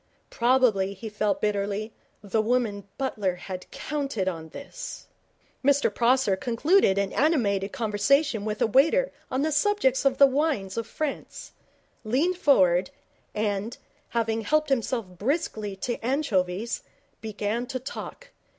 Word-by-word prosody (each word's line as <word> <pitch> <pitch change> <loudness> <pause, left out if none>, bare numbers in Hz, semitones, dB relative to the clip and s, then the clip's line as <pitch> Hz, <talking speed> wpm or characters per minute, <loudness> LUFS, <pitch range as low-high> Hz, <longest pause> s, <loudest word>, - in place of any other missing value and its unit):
Probably, 235 -6 +2
he 220 +3 -7
felt 210 0 -1
bitterly, 205 +1 -1 0.3
the 215 +2 +1
woman 215 -4 0
Butler 210 -9 -1
had 185 0 -8
counted 275 -10 -3
on 165 -3 -4
this. - - -8 0.6
Mr 280 -5 +3
Prosser 240 -3 +3
concluded 240 - +2
an 200 -1 0
animated 210 -11 +1
conversation 230 +1 +1
with 215 0 -1
a - - +5
waiter 320 - +3 0.2
on 260 +2 0
the 315 - +1
subject 300 -4 +2
of 270 -1 +2
the 280 - +8
wines 270 -9 0
of 230 -1 -3
France, 305 +2 -5 0.5
leaned 285 +12 +1
forward, 185 - +4 0.5
and, 210 +1 -2 0.3
having 225 -1 0
helped 305 +7 +1
himself 245 -3 0
briskly 210 - -2
to 230 +4 -4
anchovies, 225 -6 0 0.4
began 220 +2 -3
to 260 0 -3
talk. 390 - -8
230 Hz, 130 wpm, -26 LUFS, 200-275 Hz, 0.6 s, the